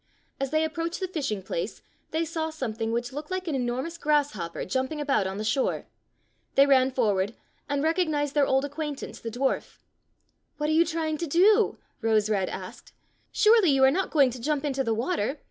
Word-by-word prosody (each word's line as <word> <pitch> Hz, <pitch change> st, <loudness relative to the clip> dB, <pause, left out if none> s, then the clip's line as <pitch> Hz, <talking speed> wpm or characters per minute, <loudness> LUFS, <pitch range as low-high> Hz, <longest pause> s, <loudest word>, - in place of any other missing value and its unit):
As 275 Hz, 0 st, -1 dB
they 310 Hz, +2 st, +2 dB
approached 330 Hz, +1 st, -3 dB
the 375 Hz, -, -2 dB
fishing 280 Hz, -, -3 dB
place 185 Hz, +2 st, -4 dB, 0.3 s
they 320 Hz, +1 st, -1 dB
saw 320 Hz, -1 st, -2 dB
some 265 Hz, -8 st, -4 dB
thing 225 Hz, 0 st, -2 dB
which 240 Hz, +2 st, -2 dB
looked 295 Hz, +2 st, -6 dB
like 370 Hz, -1 st, -3 dB
an 320 Hz, -, -1 dB
enormous 260 Hz, +6 st, -2 dB
grass 295 Hz, -1 st, +2 dB
hopper 170 Hz, -4 st, -5 dB
jumping 260 Hz, +8 st, -2 dB
about 275 Hz, -10 st, +1 dB
on 190 Hz, +1 st, -4 dB
the 210 Hz, -, -3 dB
shore. 220 Hz, +5 st, 0 dB, 0.7 s
They 275 Hz, -, +7 dB
ran 265 Hz, -2 st, +4 dB
forward 210 Hz, -5 st, 0 dB, 0.3 s
and 285 Hz, 0 st, 0 dB
recognized 310 Hz, -4 st, +1 dB
their 290 Hz, -2 st, +3 dB
old 265 Hz, +1 st, +2 dB
acquain 295 Hz, +1 st, -4 dB
tance, -, -, -8 dB
the 230 Hz, -, -5 dB
dwarf. 255 Hz, +4 st, -2 dB, 0.8 s
''What 300 Hz, +1 st, -1 dB
are 315 Hz, -, +4 dB
you 335 Hz, -, +5 dB
trying 315 Hz, -2 st, -2 dB
to 340 Hz, -, -2 dB
do?'^ 405 Hz, +8 st, +4 dB, 0.2 s
Rose 220 Hz, -2 st, +2 dB
red 195 Hz, -3 st, +1 dB
asked. -, -, -8 dB, 0.4 s
"Surely 430 Hz, -4 st, +5 dB
you 270 Hz, -1 st, +4 dB
are 265 Hz, -, +7 dB
not 380 Hz, +6 st, 0 dB
going 280 Hz, -5 st, +4 dB
to 245 Hz, 0 st, -8 dB
jump 300 Hz, +2 st, -1 dB
into 270 Hz, -2 st, 0 dB
the 225 Hz, -3 st, 0 dB
water." 260 Hz, -, -1 dB
280 Hz, 200 wpm, -27 LUFS, 240-315 Hz, 0.8 s, They